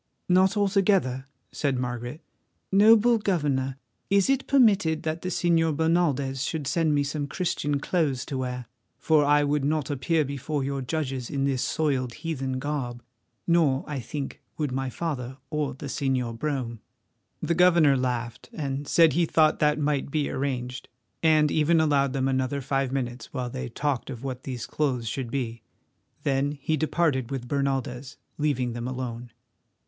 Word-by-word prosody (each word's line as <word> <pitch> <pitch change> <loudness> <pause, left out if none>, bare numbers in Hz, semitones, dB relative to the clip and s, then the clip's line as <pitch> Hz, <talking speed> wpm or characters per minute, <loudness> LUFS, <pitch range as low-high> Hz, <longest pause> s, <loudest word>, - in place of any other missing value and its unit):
"Not 185 +3 +4
altogether," 195 -10 +2 0.2
said 140 -3 -1
Margaret. 120 +4 -4 0.5
"Noble 220 +4 +6
Governor, 145 -9 0 0.3
is 200 +5 +4
it 270 0 0
permitted 200 - +4
that 160 +1 -2
the 185 - -3
Señor 165 -3 +2
Bernaldez 150 -5 +1
should 155 -1 -3
send 160 +1 +1
me 145 - +2
some 145 0 -3
Christian 145 -3 -1
clothes 145 -6 0
to 135 - -4
wear, 125 -1 -3 0.3
for 155 -2 +3
I 145 +1 +4
would 145 0 +1
not 150 -1 0
appear 155 +3 +1
before 140 +1 -3
your 140 0 -2
judges 130 -3 -3
in 140 -1 -1
this 135 -2 0
soiled 135 -6 0
heathen 135 -6 -3
garb, 130 -4 -3 0.4
nor, 160 -6 +3
I 145 -3 -4
think, 135 +3 -6 0.2
would 150 -4 -1
my 135 0 -2
father 130 -4 -4
or 150 -3 -1
the 140 - -8
Señor 130 -4 -1
Brome?" 125 -3 -3 0.6
The 170 - 0
governor 170 -5 +5
laughed, 120 -3 -3
and 140 -1 -3
said 165 -4 +5
he 170 +2 +2
thought 155 -1 +3
that 150 0 +3
might 145 -2 0
be 150 0 -1
arranged, 125 -2 -3 0.3
and 155 -2 +4
even 160 +2 +3
allowed 140 -4 +2
them 135 -1 0
another 130 +1 0
five 135 0 -1
minutes, 125 -3 -4
while 125 -3 -3
they 65 - -5
talked 140 -5 -2
of 125 -2 -7
what 130 -2 -5
these 125 -3 -4
clothes 130 -6 -1
should 125 +2 -3
be. 115 -3 -3 0.6
Then 140 +1 +1
he 150 +2 -1
departed 150 -4 0
with 130 -3 -4
Bernaldez, 135 -1 -2 0.2
leaving 130 -5 0
them 120 +1 -4
alone. 125 -2 -5
140 Hz, 160 wpm, -26 LUFS, 130-155 Hz, 0.6 s, Noble